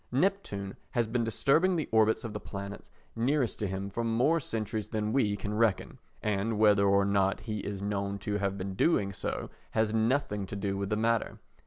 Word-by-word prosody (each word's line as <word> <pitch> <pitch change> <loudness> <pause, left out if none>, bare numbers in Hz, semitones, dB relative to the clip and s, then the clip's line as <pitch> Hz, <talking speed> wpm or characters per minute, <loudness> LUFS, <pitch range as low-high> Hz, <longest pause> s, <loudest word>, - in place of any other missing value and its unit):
Neptune 125 - 0 0.2
has 120 - +3
been 115 +2 0
disturbing 155 +11 +3
the 160 -4 -1
orbits 110 0 +3
of 115 -2 -5
the - - -4
planets 100 0 -7 0.3
nearest 125 +2 +1
to 105 - -1
him 95 +1 -4
for 115 +4 -2
more 125 +9 +2
centuries 110 -5 -2
than 110 -1 -2
we 105 -7 +2
can 105 +2 -4
reckon, 110 -3 +1 0.2
and 105 +1 0
whether 105 -2 +5
or 100 0 +4
not 100 -1 +1
he 110 -2 -4
is 100 -1 -5
known 100 -1 -2
to 105 +1 -2
have 100 0 -1
been 95 0 -4
doing 100 - +2
so - - -4 0.3
has 110 -1 +2
nothing 110 -3 +1
to - - -6
do 100 -1 -2
with 100 0 -3
the 105 - +1
matter. 115 +1 +1
105 Hz, 195 wpm, -30 LUFS, 100-115 Hz, 0.3 s, whether